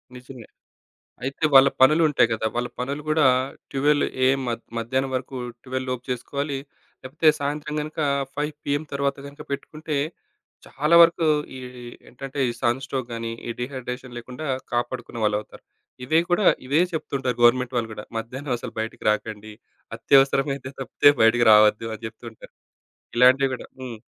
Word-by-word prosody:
నిజమే. 125 -2 -11 0.8
అయితే 135 +4 -5
వాళ్ళ 135 0 +9
పనులు 155 +5 +6
ఉంటాయి 135 -5 +3
కదా. 110 - -3
వాళ్ళ 120 0 -1
పనులు 140 +4 -3
కూడా 155 -1 +3 0.5
12 145 +2 +2 0.2
ఏఎం 135 +1 +3
మ - - 0 0.3
మధ్యాహ్నం 130 +3 -1
వరకు, 130 +1 -5 0.3
12 130 0 -4
లోపు 125 -1 -3
చేసుకోవాలి. 140 +3 -3 0.5
లేకపోతే 130 +5 -1
సాయంత్రం 150 +1 -3
గనక 155 +1 -7 0.4
5 150 +1 -2
పీఎం 145 +2 -1
తర్వాత 140 0 -1
గనక 140 0 -12
పెట్టుకుంటే 150 +2 -4 0.7
చాలా 150 +4 +1
వరకు 170 0 +5 0.3
ఈ - - -8 0.5
ఏంటంటే 135 +3 -7
ఈ - - -1
సన్ 120 +3 +1
స్ట్రోక్ 130 -2 -4
గానీ, 115 0 -4 0.2
ఈ - - -4
డీహైడ్రేషన్ 125 -1 -6
లేకుండా 125 +5 -8 0.3
కాపాడుకునే 120 -1 -3
వాళ్లవుతారు. 105 0 -2 0.4
ఇవే 155 +6 +3
కూడా 180 +3 +2 0.2
ఇవే 145 +6 +3
చెప్తుంటారు. 135 -5 -2
గవర్నమెంట్ 125 +1 +4
వాళ్లు 115 -1 -1
కూడా 105 - -8
మధ్యాహ్నం 125 +5 -4
అసలు 115 -1 -8
బయటికి 110 0 -5
రాకండి. 110 0 -5 0.4
అత్యవసరమైతే 135 0 +2
తప్పితే 135 +2 +4
బయటికి 120 +1 +4
రావద్దు 105 +1 +5
అని 110 - -15
చెప్తుంటారు. 110 0 -12 0.7
ఇలాంటివి 130 +2 +5
కూడా - - -9
హ్మ్. 120 -4 -7
130 Hz, 145 wpm, -24 LUFS, 120-140 Hz, 0.8 s, వాళ్ళ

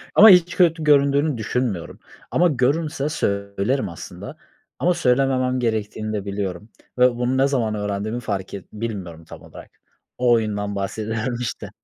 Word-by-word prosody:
Ama 220 - +10
hiç 180 -2 +5
kötü 165 -3 +3
göründüğünü 140 -1 +3
düşünmüyorum. 110 -5 -3 0.3
Ama 180 - +4
görünse 145 +1 0
söylerim 100 - -1
aslında. 85 - -9 0.4
Ama 180 - +2
söylememem 130 -4 +1
gerektiğini 110 -2 -2
de 100 -2 -3
biliyorum 100 0 -4 0.3
ve 125 0 +6
bunu 125 +2 0
ne 135 - +4
zaman 120 -6 0
öğrendiğimi 105 +3 -3
fark 100 -5 -4
et 100 - -7
bilmiyorum 95 -7 -6
tam - - -12
olarak. - - -13 0.5
O 125 -1 +2
oyundan 105 -2 -1
bahsediyorum, 110 +4 -3
işte. 120 - -5
115 Hz, 140 wpm, -22 LUFS, 100-135 Hz, 0.5 s, Ama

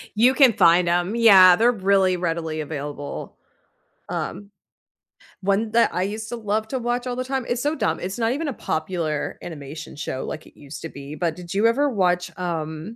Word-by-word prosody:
You 245 +5 +5
can 265 -5 +6
find 175 -1 +4
'em 175 +4 0
yeah, 195 -6 +8
they're 235 +5 +4
really 195 -3 +2
readily 165 -2 -2
available. 145 -1 -6 0.7
Um, 200 0 -5 0.9
one 200 +3 0
that 235 0 +3
I 180 - 0
used 215 +3 -4
to 240 - -4
love 215 -1 -2
to 260 - -2
watch 245 +1 -2
all 245 - -2
the 255 - -2
time 265 -1 -2
it's 240 0 -1
so 295 +2 0
dumb, 165 - -1
it's 190 +2 -5
not 225 0 +1
even 295 +4 -2
a 280 - -2
popular 155 -5 -3
animation 155 -1 -8
show 145 -3 -4
like 155 - -6
it - - -20
used 145 +1 -10
to 165 - -5
be, 140 +1 -9
but 165 -1 -1
did 180 0 -8
you 205 +3 +3
ever 280 +5 +2
watch, 180 -5 0
um 165 +3 -4
185 Hz, 195 wpm, -23 LUFS, 160-230 Hz, 0.9 s, yeah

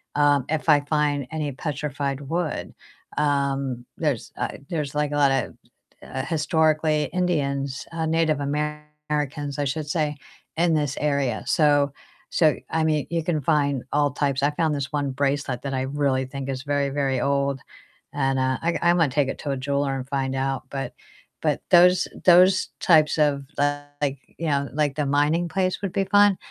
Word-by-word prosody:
um, 145 -2 +3
if 160 +1 -1
I 150 -1 +7
find 145 -2 0
any 150 -2 -2
petrified 140 -1 -3
wood. 160 +3 -3 0.4
Um, 140 -4 0
there's, 150 -7 -2
uh - - -1 0.2
there's, 150 -4 -3
like, 150 -1 0
a 145 - -2
lot 140 -2 +4
of, 135 -2 -1 0.5
uh, 130 - -5
historically 155 -1 +2
Indians, 140 -7 -1
uh, 165 -1 -2
Native 160 -2 +1
Americans, 150 0 -3
I 145 - +1
should 150 +2 -3
say, 150 -2 0 0.4
in 170 0 +3
this 145 -3 0
area. 140 -6 0
So 145 -2 +3 0.4
so 155 -3 +3 0.2
I 160 0 +1
mean, 155 -2 +1
you 170 -1 0
can 160 -3 0
find 140 -3 +1
all 145 -1 +2
types. 140 -1 -1
I 145 - +3
found 160 0 0
this 140 -1 -4
one 145 -2 0
bracelet 135 -1 -1
that 140 -1 -3
I 130 - 0
really 135 -1 0
think 135 +1 -6
is 135 -1 -4
very, 145 -1 0
very 135 -2 0
old 140 -1 0 0.6
and, 135 -1 +1
uh, 130 0 +1
I 170 +1 0
I'm 175 +1 +4
gonna 165 -5 +3
take 140 0 +1
it - - -5
to 145 - -5
a 135 - -1
jeweler 140 +1 -1
and 130 -1 -5
find 135 -1 -1
out. 135 0 -1
But 135 -1 -4 0.5
but - - 0
those 180 +1 +6 0.2
those 185 +1 +6
types 155 -3 +4
of, 145 -2 +2 0.2
uh, 145 0 +1 0.2
like 140 -1 -1 0.2
you 165 - -3
know, 140 -2 0
like, 145 -2 0
the 150 - 0
mining 150 +5 +2
place 185 +1 -1
would 195 -3 -2
be 195 - +1
fun. 205 -1 +5
145 Hz, 180 wpm, -24 LUFS, 140-155 Hz, 0.6 s, I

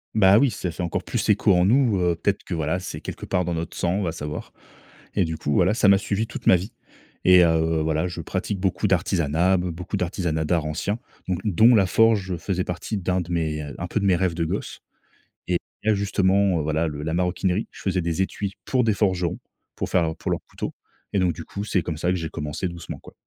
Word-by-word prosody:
Bah 100 -1 +6
oui 140 - +4
ça 95 -5 -4
fait 90 - -6
encore 85 - -2
plus - - -2
écho 105 -1 +4
en 90 0 +4
nous, 115 -3 +3
heu, 90 -1 +2
peut-être 100 +4 -1
que 90 - -5
voilà 80 +2 -1
c'est 90 - -7
quelque - - -7
part 90 -1 0
dans 85 0 -2
notre 80 0 -4
sang 90 +4 0
va 85 -4 -1
savoir 75 -1 -6 0.6
et 95 -4 +3
du 80 0 -4
coup 75 -2 -3
voilà 95 +5 +3
ça 105 -3 +4
m'a 100 - +7
suivi 105 +2 -1
toute 120 - -7
ma - - +8
vie, 95 +5 -3 0.5
et 90 -1 +8
heu, 80 -1 +2
voilà, 80 +2 0
je 85 - -5
pratique 100 - -3
beaucoup 95 +2 +1
d'artisanat, 90 -1 +2
be 90 - -2
beaucoup 85 +2 -4
d'artisanat 85 -3 -1
d'art 85 0 +1
ancien, 100 +8 -2 0.3
don 95 - +1 0.3
dont 120 - +7
la 100 - +5
forge 100 -2 +2
faisait 90 +2 -2
partie 95 +3 -4
un 90 0 +2
de 85 - -8
mes, 80 -2 -1
heu, 70 -2 -8
un 90 - -4
peu - - 0
de 100 - -1
mes 95 -2 +4
rêves 90 -1 0
de 85 -1 0
gosse, - - -4 0.7
et 90 -1 +2 0.3
la 110 - +3
justement, 100 -2 +2
heu, - - -1
voilà, 80 +2 0
le 75 -1 -5
la 80 +1 -2
maroquinerie, 90 +3 0
je - - -13
faisais 95 -2 0
des 85 +3 0
étuis 100 +1 -4
pour 130 -2 +2
des 110 - +2
forgerons, 90 -5 0 0.4
pour - - -3
faire 80 -3 +2
pour - - -4
leur - - -1
couteau - - -5 0.4
et 100 - +2
donc 90 -3 +2
du 80 - -8
coup 100 - -5
c'est 95 -4 0
comme 80 -3 -4
ça 90 +3 0
que 90 - +2
j'ai 80 -2 -3
commencé 75 +3 -4
doucement 85 -1 -7
quoi. - - -15
90 Hz, 235 wpm, -24 LUFS, 80-100 Hz, 0.7 s, ma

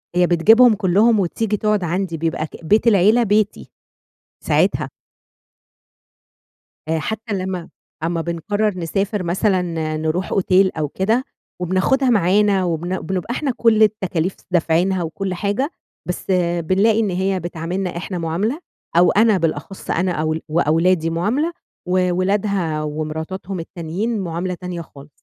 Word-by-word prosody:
هي 180 0 +4
بتجيبهم 220 +8 +6
كلّهم 210 +3 +3
وتيجي 210 +3 -1
تقعد 210 -2 +1
عندي، 175 0 -2
بيبقى 160 0 -1
أك 160 +1 -9
بيت 215 +8 +3
العيلة 215 +3 +5
بيتي، 210 -1 0 0.8
ساعتها. - - +1 2.0
آآ، 160 0 +1
حتى 220 +6 -4
لمّا 185 -3 -3 0.3
أمّا 165 0 -1
بنقرّر 190 +5 -1
نسافر 195 +4 -1
مثلًا 185 +3 +1 0.3
آآ، - - -2
نروح 160 +4 -2
أوتيل 190 0 +3
أو 155 -1 0
كده، 220 - 0 0.4
وبناخدها 190 +10 +1
معانا 200 -2 +3
وبن 175 +2 -2
بنبقى 190 +3 -3
إحنا 275 +1 -1
كُلّ 220 -2 +4
التكاليف 190 -4 0 0.2
دافعينها 175 +2 +1
وكُلّ 185 +4 -4
حاجة 205 - -1 0.4
بس 180 - -5
آآ، 175 -2 +1
بنلاقي 200 +6 +2
إن 215 -3 +1
هي 190 +1 0
بتعاملنا 175 +2 -4
إحنا 185 +1 -4
معاملة، 175 - -1 0.4
أو 175 - +6
أنا 215 -1 +4
بالأخص 165 +2 -3
أنا 180 +1 +1
أول 155 -1 -1
وأولادي 165 +2 +2
معاملة، 215 - 0 0.4
وولادها 185 -2 0
ومراتاتهم 160 +5 -4
التانيين 180 +7 -3
معاملة 180 0 -3
تانية 180 -1 -6
خالص. 145 -2 -14
185 Hz, 130 wpm, -20 LUFS, 170-205 Hz, 2.0 s, بتجيبهم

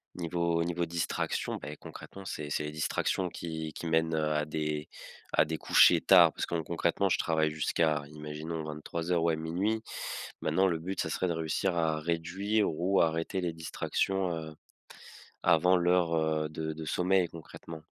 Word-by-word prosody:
niveau 85 -1 0
niveau 85 0 -1
distractions, 85 0 -2
beh, - - -7
concrètement, 100 - -10
c'est 75 -4 -5
c'est 75 - 0
les 75 - -4
distractions 75 +4 -1
qui 80 -2 -5
qui 85 - -6
mènent, 80 0 +2
heu, 75 -1 0
à 75 0 0
des 75 0 -3 0.5
à - - +5
des 80 +1 -3
couchers - - +6
tard, - - +7
parce - - -2
que - - -7
con 80 - -1
concrètement, 85 +4 0
je - - +3
travaille 80 -2 +1
jusqu'à, 75 0 +1
imaginons, 75 +2 -5
23:00, 80 +3 -2
ouais, 85 -1 +2
00:00. 90 +8 -1 0.6
Maintenant 95 +5 +2
le 85 -3 0
but, 90 +4 -5
ça - - -2
serait 95 - -1
de - - +1
réussir 80 +3 -1
à 80 -2 +1
réduire, 85 +6 0
ou 90 +5 +2
arrêter 80 +3 0
les 85 -2 -2
distractions, 90 +3 -1
heu, 80 -1 -7 0.9
avant 90 +3 +5
l'heure, 90 -1 +2
heu, 80 -1 +1
de 80 +1 -4
de 80 +1 -7
sommeil, 90 +4 +2
concrètement. 80 0 -10
80 Hz, 170 wpm, -30 LUFS, 80-90 Hz, 0.9 s, tard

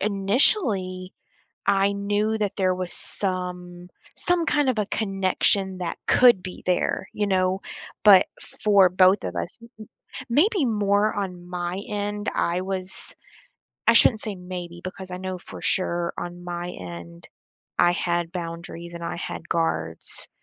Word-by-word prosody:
initially, 195 - +2 0.5
I 200 0 +3
knew 205 +2 0
that 205 -2 -1
there 185 -2 +2
was 180 -1 -4
some 180 -2 -3 0.3
some 350 -2 +1
kind 295 -3 +2
of 250 -4 +1
a 210 - 0
connection 195 -1 +1
that 180 -2 -4
could 240 -7 +6
be 185 - -8
there, 180 +1 0
you 210 - -1
know, 185 0 +1 0.4
but 195 -3 +8
for 200 -3 +3
both 185 +2 +4
of 90 - -4
us, 85 -1 -4
m 230 - -14 0.5
m 260 - -8
maybe 330 - +3
more 210 -2 +2
on 180 -4 -4
my 180 +1 -3
end, 205 0 -3
I 175 +1 0
was 190 0 -4 0.7
I 230 - +7
shouldn't 225 -1 +5
say 215 -3 -3
maybe 180 -2 -7
because 185 0 -7
I - - -3
know 185 0 -4
for - - -11
sure, 175 -2 0
on 175 0 -6
my 175 0 -4
end, 85 - -9 0.5
I 175 - +5
had 175 -1 -1
boundaries 170 0 -6
and 170 0 -7
I - - -3
had - - -6
guards, 80 0 -1
185 Hz, 150 wpm, -24 LUFS, 175-205 Hz, 0.7 s, but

